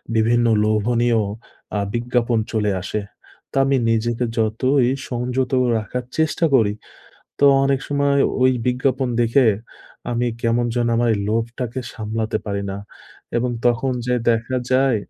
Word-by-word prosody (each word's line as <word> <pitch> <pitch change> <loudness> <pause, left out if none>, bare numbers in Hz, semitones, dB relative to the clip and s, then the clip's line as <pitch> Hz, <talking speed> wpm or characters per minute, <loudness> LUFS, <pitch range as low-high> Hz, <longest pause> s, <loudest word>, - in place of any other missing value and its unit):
বিভিন্ন 120 +2 +3 0.2
লোভনীয় 115 +2 +2 0.6
আ - - +1
বিজ্ঞাপন 120 -1 0
চলে 105 -2 +1
আসে। 105 +3 -3 0.5
তো - - -14
আমি 135 0 +2 0.2
নিজেকে 115 +2 0
যতই 120 +4 +2 0.2
সংযত 125 +1 -2 0.3
রাখার 110 +4 -4 0.2
চেষ্টা 160 +1 +2
করি, 110 -5 +3 0.7
তো - - 0 0.2
অনেক 135 -1 +2
সময় 140 -1 +1 0.2
ওই 130 - +5 0.2
বিজ্ঞাপন 130 +1 0
দেখে, 120 +2 +3 0.6
আমি 120 +1 0
কেমন 120 +1 +1
যেন 120 -1 +1
আমার 120 0 +2
এই - - -3
লোভটাকে 115 +3 -2
সামলাতে 110 0 -2
পারি 100 -1 -2
না। 95 - -5 0.6
এবং 125 +1 0 0.2
তখন 120 +2 +1
যেয়ে 125 -1 0
দেখা 115 +3 -1 0.2
যায়, 130 -2 +3
120 Hz, 135 wpm, -21 LUFS, 115-130 Hz, 0.7 s, ওই